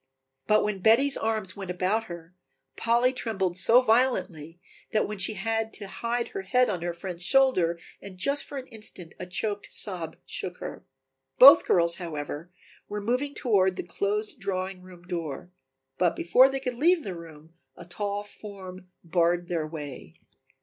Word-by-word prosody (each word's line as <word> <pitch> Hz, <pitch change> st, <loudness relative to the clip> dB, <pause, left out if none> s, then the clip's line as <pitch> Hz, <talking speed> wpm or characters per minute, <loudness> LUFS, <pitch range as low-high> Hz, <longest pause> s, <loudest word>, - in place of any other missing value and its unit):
But 215 Hz, 0 st, +4 dB
when 205 Hz, -2 st, -2 dB
Betty's 235 Hz, +8 st, +5 dB
arms 220 Hz, -4 st, -2 dB
went 195 Hz, -2 st, -7 dB
about 185 Hz, +5 st, 0 dB
her, 170 Hz, -2 st, -10 dB, 0.4 s
Polly 240 Hz, +2 st, +2 dB
trembled 195 Hz, -8 st, -2 dB
so 235 Hz, +7 st, +5 dB
violently 220 Hz, -, +1 dB, 0.3 s
that 210 Hz, -2 st, 0 dB
she 215 Hz, +3 st, -1 dB
had 225 Hz, +2 st, -1 dB
to 205 Hz, -, -7 dB
hide 235 Hz, +3 st, -3 dB
her 395 Hz, -, -5 dB
head 250 Hz, -, +2 dB
on 180 Hz, -4 st, -4 dB
her 175 Hz, 0 st, -2 dB
friend's 175 Hz, 0 st, -7 dB
shoulder 200 Hz, -9 st, +3 dB, 0.2 s
and 195 Hz, -2 st, -10 dB
just 280 Hz, +10 st, +2 dB
for 285 Hz, -, -7 dB
an 260 Hz, -, -6 dB
instant 210 Hz, -7 st, -8 dB
a 185 Hz, -, -6 dB
choked 205 Hz, +3 st, -3 dB
sob 175 Hz, -6 st, -4 dB
shook -, -, -5 dB
her. -, -, -7 dB, 0.5 s
Both -, -, +9 dB
girls, 170 Hz, -1 st, +3 dB
however, 155 Hz, -1 st, -6 dB, 0.4 s
were 210 Hz, -, -3 dB
moving 250 Hz, +7 st, -1 dB
toward 190 Hz, -7 st, +2 dB
the -, -, -4 dB
closed 205 Hz, +4 st, -2 dB
drawing 190 Hz, -1 st, -3 dB
room 180 Hz, -1 st, -14 dB
door, 175 Hz, -1 st, -5 dB, 0.5 s
but 175 Hz, -2 st, +2 dB
before 250 Hz, +11 st, +5 dB
they 270 Hz, 0 st, -2 dB
could 250 Hz, -3 st, -4 dB
leave 335 Hz, +4 st, +3 dB
the 195 Hz, -, -4 dB
room 165 Hz, -2 st, -12 dB, 0.2 s
a -, -, -10 dB
tall 205 Hz, +3 st, -3 dB
form 190 Hz, -3 st, -10 dB, 0.2 s
barred 175 Hz, 0 st, +1 dB
their 165 Hz, -3 st, -1 dB
way. 145 Hz, -, -8 dB
195 Hz, 165 wpm, -27 LUFS, 175-225 Hz, 0.5 s, Both